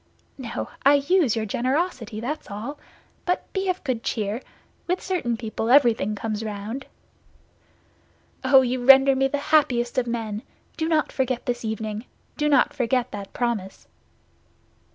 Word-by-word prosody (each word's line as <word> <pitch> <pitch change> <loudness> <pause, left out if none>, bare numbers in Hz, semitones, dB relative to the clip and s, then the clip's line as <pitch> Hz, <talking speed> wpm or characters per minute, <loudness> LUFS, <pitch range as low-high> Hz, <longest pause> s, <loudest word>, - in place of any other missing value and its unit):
"No, 240 -3 -5
I 280 +1 +7
use 285 - +2
your 220 -1 -1
generosity, 250 - -1
that's 280 +7 -4
all. 230 +9 -6 0.4
But 360 -1 -2
be 385 -1 -1
of 365 0 -2
good 255 -5 -2
cheer; 215 +1 -2 0.5
with 360 +1 0
certain 315 -12 -2
people, 225 0 -3
everything 235 -6 +4
comes 215 +1 -3
round." 215 +5 -5 1.6
"Oh, 265 +1 +7
you 250 0 -1
render 270 +1 +7
me 270 0 +2
the 285 - -1 0.2
happiest 245 -5 +3
of 245 - -2
men! 220 -3 -3 0.3
Do 320 0 -1
not 310 -2 +1
forget 255 -2 -1
this 240 -1 -2
evening—do 220 +7 -4
not 285 - +4
forget 250 0 0
that 200 -1 -7
promise." 230 -6 -3
245 Hz, 140 wpm, -24 LUFS, 220-280 Hz, 1.6 s, I